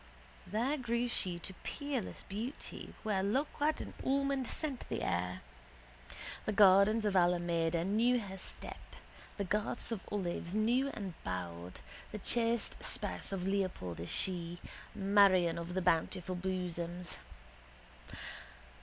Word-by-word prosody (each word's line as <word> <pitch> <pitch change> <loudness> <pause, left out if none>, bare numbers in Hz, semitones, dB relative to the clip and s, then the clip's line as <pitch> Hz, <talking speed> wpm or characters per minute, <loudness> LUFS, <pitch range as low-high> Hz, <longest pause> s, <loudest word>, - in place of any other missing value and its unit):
There 245 +9 +1
grew 240 -2 0
she 185 -7 -1
to 180 +2 -7
peerless 285 -7 -3
beauty 225 +8 -5
where 210 -3 +1
loquat 290 +8 +1
and - - -7
almond 275 -1 +2
scent 285 -6 -1
the - - -2
air. 90 +1 -1 1.0
The - - +1
gardens 205 +2 +6
of 205 -2 +1
Alameda 170 -2 +3
knew 235 +5 +3
her 195 -3 -6
step: - - -7 0.4
the 200 - 0
garths 210 +5 -1
of 220 -4 -2
olives 180 -2 -2
knew 240 +6 +3
and 195 -4 -4
bowed. 90 -1 -4 0.3
The 215 - -4
chaste 230 +2 +1
spouse - - -4
of 190 -2 -2
Leopold 185 - -1
is 85 - -3
she: 175 -2 +1 0.4
Marion 195 -4 +5
of 170 +2 -5
the 185 - +1
bountiful 180 +1 +1
bosoms. 180 -1 -3
195 Hz, 125 wpm, -34 LUFS, 175-230 Hz, 1.0 s, gardens